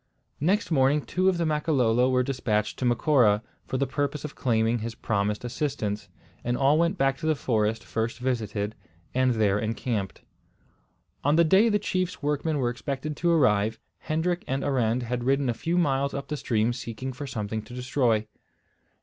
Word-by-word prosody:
Next 185 +7 +1
morning 140 0 +3
two 185 +2 +1
of 185 - 0
the 170 - 0
Makololo 130 -6 +2
were 125 -1 +3
despatched 115 -5 -1
to 130 - -1
Macora, 120 -4 +3 0.2
for 130 - -2
the 140 - +1
purpose 145 +2 -2
of 150 - -6
claiming 115 -2 +1
his 115 +1 -5
promised 105 -1 -1
assistance; 110 -7 -3 0.3
and 120 +1 0
all 140 +3 +4
went 170 +3 +1
back 135 -3 +1
to 160 - -3
the 155 - +3
forest 110 -4 0
first 115 +1 -2
visited, 110 -5 -2 0.4
and 130 -1 +2
there 105 -2 +2
encamped. 110 -2 -3 1.0
On 145 +2 +3
the 170 - +6
day 190 +8 +5
the 210 - +3
chief's 185 -4 -2
workmen 150 +1 0
were 120 -3 +1
expected 140 +4 -4
to 170 - +1
arrive, 110 -9 +3 0.2
Hendrik 175 +3 -1
and 135 +1 -1
Arend 125 -3 +1
had 120 0 -3
ridden 135 +1 +2
a - - +1
few 165 +9 -2
miles 140 -4 +1
up 140 - -5
the 150 - -1
stream 115 -2 +1
seeking 125 +2 -5
for 140 +3 -6
something 110 -3 -3
to 120 - -11
destroy. 125 -4 +1
130 Hz, 175 wpm, -26 LUFS, 115-150 Hz, 1.0 s, the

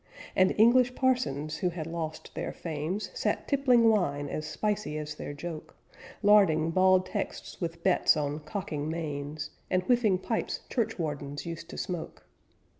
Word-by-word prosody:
And 185 0 +4
English 245 +2 +5
parsons, 155 - 0
who 180 - 0
had 165 -2 -5
lost 165 -1 -5
their 165 - -3
fames, 165 +5 -4
Sat - - -1
tippling 255 -5 +4
wine 145 -10 +2
as 155 0 -4
spicy 210 -3 -2
as 150 0 -4
their 150 - -6
joke, 155 +2 -7 0.5
Larding 190 -6 +5
bald 185 +1 +4
texts 185 - -5
with 170 -1 -4
bets 185 -3 +4
on 145 0 -1
cocking 155 -2 -4
mains, 150 -2 -4 0.2
And 185 0 +2
whiffing 230 -4 +3
pipes 225 +4 -2
churchwardens 145 - -2
used 170 0 -6
to - - -8
smoke. 175 -3 -5
170 Hz, 145 wpm, -29 LUFS, 155-205 Hz, 0.5 s, English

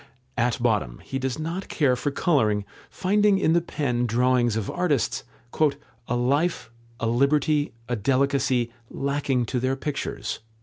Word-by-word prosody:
At 120 -1 +1
bottom 105 - 0
he 135 - -4
does 130 -1 -2
not 165 +5 -4
care 140 -5 +2
for 145 - -1
colouring, 110 - +1 0.2
finding 205 +1 +2
in 165 -4 +2
the 170 - +4
pen 125 -7 -1
drawings 120 0 +2
of 110 -3 -2
artists 165 -10 0 0.8
"a 120 - 0
life, 140 +4 0 0.3
a - - -1
liberty, 145 +5 +2 0.2
a 125 - -1
delicacy, 130 0 +1 0.2
lacking 140 -3 0
to 125 +2 -1
their 130 +2 0
pictures." 135 -6 -4
130 Hz, 140 wpm, -25 LUFS, 120-150 Hz, 0.8 s, the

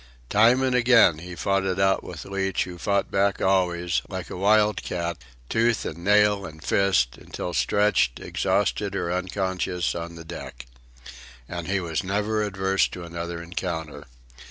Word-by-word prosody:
Time 120 +5 +5
and 130 -1 +1
again 115 -9 +5
he 90 +2 -8
fought 95 +2 0
it 95 0 -1
out 95 0 +2
with 85 -3 -8
Leach 95 -1 -1
who 90 -1 -9
fought 100 +1 0
back 100 0 +1
always, 90 -2 +1
like - - -6
a - - -5
wildcat, 100 -4 +1 0.3
tooth 115 - +1
and 80 - -5
nail 105 0 +4
and 80 -4 -10
fist, 90 -13 +2
until 90 - -6
stretched, 105 -11 +2
exhausted 100 -2 -1
or 90 -2 -1
unconscious, 95 -1 -1
on 85 0 -6
the 85 0 -10
deck. 65 -7 -8 0.8
And 85 -2 -5
he 95 +1 +1
was 85 -3 -2
never 105 +3 0
averse 95 -1 +1
to 90 - -8
another 85 0 -5
encounter. 85 -3 -5
95 Hz, 155 wpm, -25 LUFS, 85-100 Hz, 0.8 s, Time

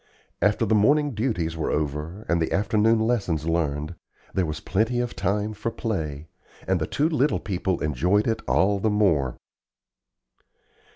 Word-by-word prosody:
After 105 +2 +2
the 110 - +1
morning 145 +8 +3
duties 105 -8 -1
were 80 - -2
over, 75 +7 -3
and 85 -1 +1
the 80 - -1
afternoon 110 +2 +3
lessons 100 -10 0
learned, 75 -1 -1 0.4
there 95 -3 +1
was 75 0 -4
plenty 110 +5 0
of 120 -1 -2
time 105 +3 -1
for 105 +2 -3
play, 80 -11 -4 0.4
and 95 -3 +1
the 80 - -1
two 150 - +1
little 150 -3 +1
people 95 -2 -2
enjoyed 90 - +2
it 115 - 0
all 95 +10 +2
the 110 - +1
more. 85 -12 +2
100 Hz, 155 wpm, -25 LUFS, 80-110 Hz, 0.4 s, morning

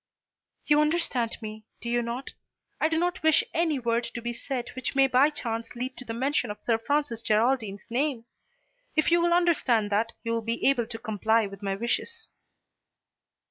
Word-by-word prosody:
"You 295 0 +5
understand 300 -7 0
me, 215 0 -7 0.2
do - - -7
you 240 0 +1
not? 235 +3 -4 0.5
I 315 - +3
do 320 - 0
not 355 +2 0
wish 315 -1 +5
any 325 -3 +1
word 235 -1 0
to - - -2
be 240 0 -4
said 245 0 -4
which 260 +1 -4
may 270 0 +6
by 265 +2 +4
chance 230 -5 -3
lead 255 +2 -4
to 255 - -9
the 225 - -5
mention 260 -1 0
of 210 - -6
Sir 225 -2 +1
Francis 285 -2 -1
Geraldine's 220 -2 +1
name. 255 -2 0 0.7
If 310 +1 +3
you 340 0 +5
will 345 0 +2
understand 285 -12 +3
that, 225 +3 +1
you 230 - -2
will 230 0 0
be 230 +1 -2
able 250 -4 +2
to 225 -1 -6
comply 220 0 +1
with 195 0 -9
my 195 -1 -1
wishes." 235 +4 -2
240 Hz, 185 wpm, -27 LUFS, 225-290 Hz, 0.7 s, may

